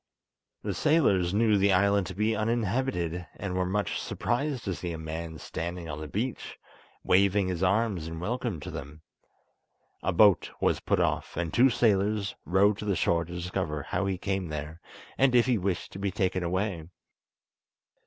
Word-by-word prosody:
The - - -2
sailors 100 - +3
knew 105 +1 +3
the 100 +1 +4
island 100 0 +3
to 95 - -7
be 110 +2 +1
uninhabited, 110 -5 -1
and 95 -3 -4
were 90 0 0
much 100 +2 -1
surprised 130 +1 -2
to 95 - -2
see 85 0 -5
a - - -5
man 80 +1 -5
standing 85 +2 -5
on 75 0 -5
the 75 - -5
beach, 110 - -4 0.5
waving 95 +1 +3
his 90 -1 -3
arms 95 -3 +1
in 80 0 -6
welcome 115 -1 -2
to - - -6
them. 75 +2 -8 1.0
A 95 - 0
boat 100 +1 +5
was - - +2
put - - 0
off, - - -1
and 85 -2 -2
two 130 +3 +6
sailors 105 -3 +1
rowed 100 +3 +3
to - - -5
the 100 -2 +1
shore 85 0 +1
to 85 - -9
discover 85 -4 -3
how 95 +6 -1
he 95 -1 -1
came 95 -1 -2
there, 75 +2 -6 0.4
and 130 -2 +4
if 120 - +6
he 120 -4 +2
wished 95 -1 -2
to 95 - -8
be 100 0 0
taken 95 -2 0
away. 90 -1 -2
95 Hz, 175 wpm, -28 LUFS, 85-105 Hz, 1.0 s, two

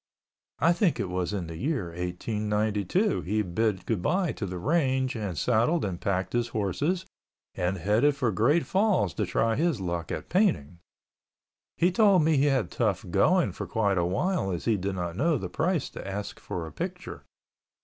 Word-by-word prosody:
I 170 +3 +4
think 175 -1 +1
it 95 - -2
was 90 0 -2
in 100 -4 -3
the 80 -1 -7
year 130 - -2
1892 105 - -1
he 105 +4 0
bid 100 +2 -1
goodbye 150 - 0
to 100 - -5
the 90 0 -5
range 130 - +1
and 100 -7 -4
saddled 120 - +2
and 90 -3 -4
packed 95 -1 -1
his 120 -1 +1
horses 140 - -1 0.5
and 90 +2 -1
headed 110 - +2
for 125 -5 0
Great 130 - +2
Falls 190 - +2
to - - -2
try 115 0 +1
his 160 -3 +1
luck 85 -3 -3
at - - -4
painting. 90 - +1 1.0
He 175 +2 +3
told 195 -3 +5
me 160 0 +3
he 140 +1 +3
had 135 -5 +1
tough - - 0
going - - +3
for - - -6
quite 100 -4 +1
awhile 95 - 0
as 85 -3 -3
he 115 - +3
did 95 0 -3
not 85 -2 -3
know 155 - +2
the - - -5
price 170 -2 0
to - - -8
ask 100 +1 -5
for 85 -2 -5
a 80 - -8
picture. - - -6
110 Hz, 180 wpm, -27 LUFS, 90-150 Hz, 1.0 s, told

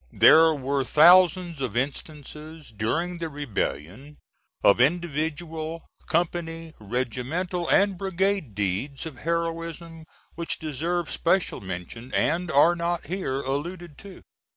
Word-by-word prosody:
There 160 0 +7
were 140 0 -1
thousands 175 +2 +5
of 120 -4 -3
instances, 150 +3 -5
during 165 - -2
the 165 -1 -3
rebellion, 135 - -4 0.5
of 100 +4 +5
individual, 160 +1 -1 0.2
company, 165 -1 -2
regimental 130 - -3
and 195 -2 +3
brigade 190 - -1
deeds 105 - -2
of 155 -6 -8
heroism 165 0 -4 0.3
which 170 0 -3
deserve 165 +3 -3
special 180 +2 0
mention 95 +6 -7
and 175 +1 +1
are 155 +4 +5
not 170 0 -2
here 150 -6 -3
alluded 150 +4 -5
to. 195 -2 -12
160 Hz, 110 wpm, -25 LUFS, 135-175 Hz, 0.5 s, There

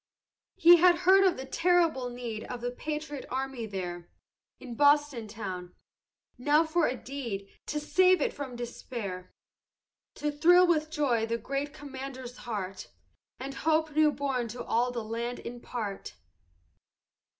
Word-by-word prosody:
"He 345 +1 +8
had 350 +1 +6
heard 385 +1 +7
of 370 - +3
the 265 - -6
terrible 330 -4 +2
need 240 -3 -5
Of 245 -1 -6
the 245 0 -2
patriot 300 +1 -5
army 260 -3 -3
there 175 -3 -5 0.5
In 250 -2 -8
Boston 285 -3 +3
town. 190 -4 -6 0.6
Now 295 +5 +4
for 320 +1 +2
a 250 - -1
deed 235 -9 -5 0.2
To 300 - -2
save 370 +4 +4
it - - 0
from 270 -4 -6
despair! 230 -6 -6 0.8
To 295 0 -2
thrill 350 +5 +6
with 310 -3 +1
joy 265 -8 +1
the 230 0 -1
great 275 +4 -3
commander's 265 -3 -8
heart, 195 -3 -4 0.5
And 275 +1 -5
hope 315 +2 +1
new 310 -1 +5
born 270 -5 -2
to 240 +2 -6
all 240 +2 +1
the 240 -2 -4
land 235 +2 -3
impart! 235 -4 -6
260 Hz, 140 wpm, -29 LUFS, 235-300 Hz, 0.8 s, He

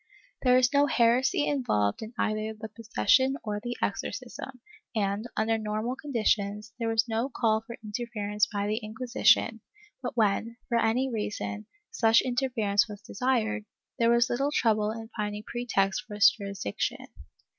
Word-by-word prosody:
There 250 -1 +5
is 255 +2 +3
no 285 0 +5
heresy 245 +3 +3
involved 105 - 0
in 220 +2 -8
either 215 0 -1
the 220 0 -6
possession 255 +4 +2
or 210 -1 -3
the 240 +2 -5
exorcism 260 -2 -4 0.4
and, 205 +1 -1
under 225 +1 +1
normal 215 +3 -2
con 290 +2 -9
ditions, 210 -2 0
there 230 - -1
was 225 0 +2
no 230 +3 -1
call 220 -4 +1
for 230 +1 -9
interference 210 -1 -1
by 205 -2 -2
the 210 +1 0
Inquisition, 225 0 +2 0.4
but 245 -1 -5
when, 225 +2 +1
for 235 - +2
any 230 +4 +2
reason, 210 -2 -4 0.2
such 225 - +4
interference 235 -6 +1
was 205 0 -9
desired, 225 -2 -1 0.3
there 230 0 +4
was 235 0 +4
little 275 +4 0
trouble 215 -6 +2
in 225 0 -6
finding 210 -1 -3
pretext 200 -5 0
for 210 - -7
its 210 +1 +7
jurisdiction. 200 - -4
225 Hz, 155 wpm, -28 LUFS, 210-245 Hz, 0.4 s, its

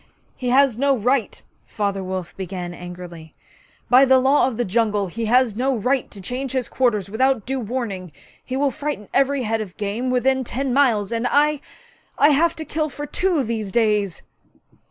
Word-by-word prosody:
'He 250 - -3
has 260 -2 +3
no 275 -1 +3
right!' 245 0 0 0.2
Father 200 -2 -3
Wolf 185 -1 -5
began 180 -2 -5
angrily 175 -2 -10 0.5
'By 255 +2 +6
the 265 -1 +5
Law 265 +1 +3
of 245 -4 -4
the 240 - 0
Jungle 210 0 +1
he 225 +5 -4
has 240 -1 +3
no 260 +2 0
right 255 +4 0
to 205 - -10
change 250 +7 -4
his 260 -2 -1
quarters 225 -7 0
without 240 +2 +1
due 265 +1 -2
warning. 215 -7 -4 0.3
He 260 - -4
will 280 0 +1
frighten 285 -9 -5
every 275 -1 +2
head 225 0 -1
of 195 -4 -8
game 215 +4 -2
within 260 +1 +1
ten 260 +1 -2
miles, 235 -7 +2
and 230 +1 0
I 295 0 +2 0.6
I 290 - +6
have 325 +3 +3
to 315 - -6
kill 310 0 -2
for 290 +2 -6
two, 345 -2 0
these 220 -4 -3
days.' 210 -5 +1
245 Hz, 180 wpm, -22 LUFS, 205-270 Hz, 0.6 s, By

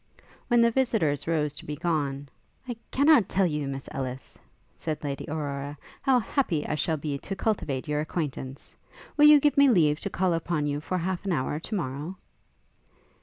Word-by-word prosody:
When 240 -1 +4
the 235 0 +5
visitors 220 - +1
rose 150 -3 0
to - - -9
be 150 - -3
gone, 145 -4 -1 0.4
'I 245 - -3
cannot 280 - +4
tell 195 0 +2
you, 150 -4 -1
Miss 135 -1 -5
Ellis,' 130 -1 -5 0.4
said 155 -2 -4
Lady 140 -1 -3
Aurora, 145 -1 -4 0.2
'how 270 -2 +4
happy 215 - 0
I - - -2
shall 155 +2 0
be 145 -1 -3
to 195 - -5
cultivate 165 -10 -1
your 150 0 0
acquaintance. 145 -4 -5 0.4
Will 295 - +6
you 300 -1 +9
give 290 0 +2
me 280 -1 +7
leave 155 -9 +4
to - - -4
call 185 -1 +1
upon 165 -2 -1
you 145 0 -1
for 185 +4 -2
half 180 +1 -2
an 195 - 0
hour 145 +1 -1
to 215 +6 -5
morrow?' 150 +1 -4
155 Hz, 180 wpm, -27 LUFS, 145-195 Hz, 0.4 s, you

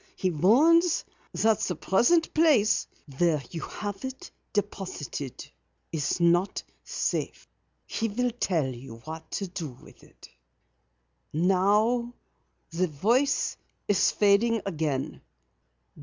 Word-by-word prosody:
He 185 - 0
warns 300 - +4 0.3
you - - -4
that 220 -1 +4
the 180 - -1
present 280 - +2
place 300 -10 +3 0.3
where 165 -5 +2
you 165 - -5
have 205 +2 -6
it 260 0 -7 0.2
deposited 185 - -4 0.4
is 160 +1 -1
not 175 +3 +2 0.2
safe. - - -3 0.4
He 225 - -2
will 245 +3 -1
tell 180 - 0
you 125 -2 -7
what 160 0 -8
to 200 - -2
do 175 -4 -5
with 125 - -17
it. - - -16 1.0
Now 210 +8 +2 0.6
the 180 +3 0
voice 235 - +1 0.3
is 205 - +3
fading 215 +2 +3
again. 155 -7 -2
195 Hz, 110 wpm, -27 LUFS, 160-235 Hz, 1.0 s, warns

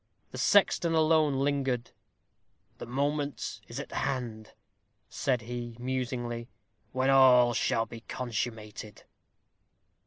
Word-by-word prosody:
The - - -7
sexton 175 -4 +3
alone 155 -2 +3
lingered. 135 -4 0 0.9
"The - - -7
moment 145 +3 -2
is - - -6
at - - -7
hand," 115 -5 -3 0.5
said 125 -3 -1
he, 120 0 -6
musingly, 125 -2 -3 0.4
"when 130 +1 +2
all 125 -3 +6
shall 115 0 +1
be 115 0 -10
consummated." 110 -4 -5
125 Hz, 100 wpm, -29 LUFS, 120-140 Hz, 0.9 s, all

